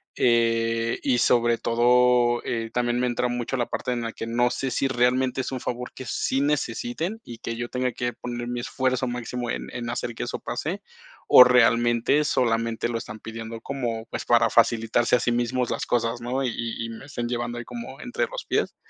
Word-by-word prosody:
Eh, 115 Hz, -1 st, +2 dB
y 125 Hz, -3 st, +2 dB
sobre 120 Hz, -1 st, +3 dB
todo 120 Hz, +1 st, +3 dB
eh, 115 Hz, -1 st, -2 dB
también 120 Hz, 0 st, 0 dB
me 125 Hz, -, +1 dB
entra 125 Hz, 0 st, 0 dB
mucho 120 Hz, +2 st, -2 dB
la 120 Hz, -, +1 dB
parte 125 Hz, -, -3 dB
en 120 Hz, -, -2 dB
la 115 Hz, 0 st, -3 dB
que 115 Hz, -, -6 dB
no 120 Hz, +1 st, +2 dB
sé 135 Hz, +1 st, -2 dB
si 135 Hz, -, +1 dB
realmente 130 Hz, +1 st, +1 dB
es 130 Hz, -, -5 dB
un 130 Hz, -, -3 dB
favor 125 Hz, +1 st, -4 dB
que 130 Hz, -, -8 dB
sí 130 Hz, +2 st, -1 dB
necesiten, 145 Hz, -, -1 dB
y 120 Hz, -1 st, -10 dB
que 115 Hz, -, -4 dB
yo 120 Hz, +1 st, -4 dB
tenga 125 Hz, -1 st, -1 dB
que 120 Hz, +1 st, -2 dB
poner 120 Hz, +1 st, -5 dB
mi 120 Hz, 0 st, -3 dB
esfuerzo 130 Hz, +1 st, -1 dB
máximo 120 Hz, 0 st, -4 dB
en -, -, -4 dB
en 120 Hz, -1 st, -5 dB
hacer 120 Hz, 0 st, -3 dB
que -, -, -4 dB
eso -, -, -4 dB
pase, -, -, -4 dB, 0.4 s
o 125 Hz, -, +10 dB
realmente 120 Hz, +2 st, +4 dB
solamente 115 Hz, -3 st, 0 dB
lo 115 Hz, -1 st, -2 dB
están 110 Hz, 0 st, -8 dB
pidiendo 115 Hz, +1 st, -7 dB
como, 120 Hz, -5 st, -3 dB
pues, -, -, -5 dB
para -, -, +4 dB
facilitarse 115 Hz, +1 st, +3 dB
a -, -, +2 dB
sí 120 Hz, -, 0 dB
mismos 120 Hz, +1 st, 0 dB
las -, -, -2 dB
cosas, 120 Hz, 0 st, 0 dB
¿no? 130 Hz, +3 st, -2 dB
Y 125 Hz, -, 0 dB, 0.3 s
y -, -, -5 dB
me 115 Hz, +3 st, -9 dB
estén 120 Hz, -4 st, -4 dB
llevando 120 Hz, 0 st, -3 dB
ahí 120 Hz, -, -5 dB
como 120 Hz, +3 st, -8 dB
entre 250 Hz, -, -2 dB
los -, -, -7 dB
pies. -, -, -1 dB
120 Hz, 205 wpm, -25 LUFS, 115-125 Hz, 0.4 s, o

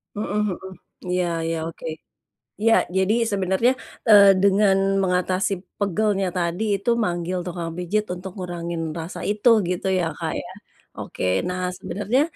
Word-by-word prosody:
Mhm 210 Hz, -1 st, -3 dB, 0.2 s
mhm, 190 Hz, 0 st, -10 dB, 0.4 s
iya 180 Hz, 0 st, +1 dB, 0.2 s
iya, 165 Hz, 0 st, -1 dB
oke, 165 Hz, -, -10 dB, 0.8 s
iya, 225 Hz, 0 st, +4 dB, 0.2 s
jadi 190 Hz, +3 st, +3 dB, 0.2 s
sebenarnya, 195 Hz, +5 st, +2 dB, 0.4 s
eee, 200 Hz, -2 st, +9 dB
dengan 200 Hz, 0 st, +4 dB, 0.3 s
mengatasi 185 Hz, +1 st, +1 dB, 0.3 s
pegalnya 200 Hz, 0 st, +1 dB
tadi 175 Hz, +4 st, -1 dB
itu 200 Hz, +4 st, -3 dB, 0.2 s
manggil 175 Hz, +1 st, -2 dB
tukang 170 Hz, -1 st, -4 dB
pijit 200 Hz, +4 st, 0 dB
untuk 185 Hz, +1 st, -8 dB
ngurangin 170 Hz, -2 st, -4 dB, 0.2 s
rasa 165 Hz, +3 st, -6 dB
itu 210 Hz, +4 st, +3 dB, 0.2 s
gitu 180 Hz, +1 st, -2 dB
ya, 170 Hz, -, +1 dB
Kak, -, -, -2 dB
ya? -, -, -10 dB, 0.5 s
Oke, -, -, -6 dB, 0.2 s
nah, 180 Hz, 0 st, -3 dB, 0.2 s
sebenarnya 210 Hz, +8 st, 0 dB
190 Hz, 135 wpm, -23 LUFS, 175-205 Hz, 0.8 s, eee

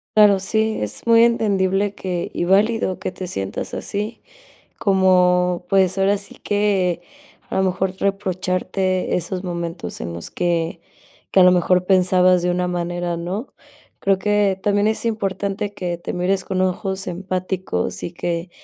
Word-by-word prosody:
Claro, 205 Hz, -2 st, +6 dB
sí, 220 Hz, +3 st, 0 dB
es 105 Hz, 0 st, -5 dB
muy 230 Hz, 0 st, +6 dB
entendible 200 Hz, -3 st, +1 dB
que 180 Hz, -3 st, -4 dB
y -, -, -1 dB
válido, 200 Hz, +1 st, +2 dB
que -, -, -3 dB
te 185 Hz, 0 st, -7 dB
sientas 95 Hz, -, -4 dB
así, 210 Hz, +3 st, -4 dB, 0.6 s
como 180 Hz, -2 st, +3 dB
pues, 190 Hz, -2 st, +3 dB
ahora 195 Hz, +1 st, +2 dB
sí 200 Hz, -, -9 dB
que, 195 Hz, -4 st, 0 dB, 0.5 s
a -, -, -3 dB
lo 190 Hz, -, +3 dB
mejor 190 Hz, 0 st, 0 dB
reprocharte 185 Hz, -1 st, -1 dB
esos 180 Hz, +1 st, -3 dB
momentos 170 Hz, -2 st, -5 dB
en 85 Hz, -, -4 dB
los 85 Hz, 0 st, -6 dB
que 170 Hz, -1 st, -1 dB, 0.5 s
que 190 Hz, -, +4 dB
a -, -, +9 dB
lo 180 Hz, -, +8 dB
mejor 180 Hz, 0 st, +2 dB
pensabas 185 Hz, -1 st, +4 dB
de 180 Hz, -, +1 dB
una 180 Hz, 0 st, 0 dB
manera, 175 Hz, 0 st, -2 dB
¿no? 185 Hz, +9 st, -5 dB, 0.5 s
Creo 195 Hz, -1 st, +2 dB
que, 205 Hz, -1 st, +1 dB
también 205 Hz, 0 st, +2 dB
es 220 Hz, +1 st, 0 dB
importante 200 Hz, -1 st, -2 dB
que 180 Hz, -3 st, -3 dB
te 170 Hz, -, -5 dB
mires 185 Hz, +1 st, 0 dB
con 185 Hz, -, -2 dB
ojos 190 Hz, +1 st, -2 dB
empáticos 185 Hz, -, -3 dB
y 170 Hz, -, -4 dB
que 170 Hz, 0 st, -3 dB
185 Hz, 155 wpm, -21 LUFS, 180-200 Hz, 0.6 s, a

